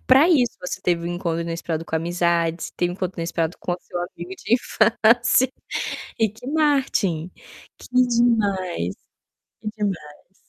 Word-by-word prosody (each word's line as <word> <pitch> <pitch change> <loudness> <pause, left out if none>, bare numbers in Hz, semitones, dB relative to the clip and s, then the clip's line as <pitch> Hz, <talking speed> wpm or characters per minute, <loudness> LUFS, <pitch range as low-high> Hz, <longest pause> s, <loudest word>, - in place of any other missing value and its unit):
pra 270 +5 +7
isso, 250 -7 +3
você 180 - -5
teve 170 -1 0
um 175 - -2
encontro 170 -2 -1
inesperado 165 -1 -3
com 160 - -5
amizades, 170 0 0
teve 175 0 0
um - - -5
encontro 185 -2 -4
inesperado 165 0 -2
com 175 - -2
o - - -1
seu 175 - -6
amigo 175 +1 -6
de 235 - +3
infância, 240 +2 +3 0.7
Ricky 220 +3 -1
Martin. 265 - +1 0.5
Que - - -12 0.2
demais! 205 - +1 0.7
Que 215 - -4
demais! 180 -4 -4
180 Hz, 145 wpm, -23 LUFS, 170-230 Hz, 0.7 s, pra